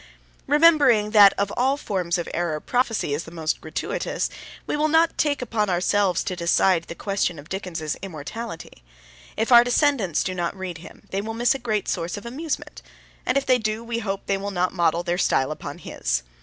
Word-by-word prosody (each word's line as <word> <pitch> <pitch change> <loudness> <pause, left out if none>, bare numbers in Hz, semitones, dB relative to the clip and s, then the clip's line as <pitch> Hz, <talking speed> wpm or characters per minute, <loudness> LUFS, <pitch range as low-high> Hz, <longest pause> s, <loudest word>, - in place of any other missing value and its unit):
Remembering 285 -8 +5
that 205 -2 +8
of 200 0 -2
all 265 +3 +2
forms 185 -10 -1
of 175 - -4
error 170 -3 -1
prophecy 230 - 0
is 150 +4 -3
the - - -10
most 160 -2 -3
gratuitous, 160 - -3 0.3
we - - -2
will 300 +1 +2
not 325 +2 +3
take 285 -3 0
upon 215 -4 -1
ourselves 185 +1 +1
to 185 - -3
decide 170 0 +2
the 170 - -8
question 195 -4 -1
of 145 +2 -12
Dickens's 170 -5 -4
immortality. 175 - -7 0.6
If 225 +3 0
our 240 0 +9
descendants 245 - +1
do 185 - -2
not 175 +1 -3
read 180 -3 -6
him 165 - -13
they 195 - -1
will 225 +2 -5
miss 240 +1 +3
a 270 - -5
great 215 -5 -2
source 170 +4 -2
of 205 - -9
amusement, 290 +6 -5 0.5
and 255 - +2
if 275 - 0
they 255 -1 +4
do, 215 +1 -2
we 230 0 -3
hope 195 -3 -4
they 195 - 0
will 200 +1 -4
not 180 -2 -1
model 170 -1 +1
their 175 0 -1
style 135 -5 +2
upon 155 - -6
his. - - -2
200 Hz, 195 wpm, -24 LUFS, 170-235 Hz, 0.6 s, our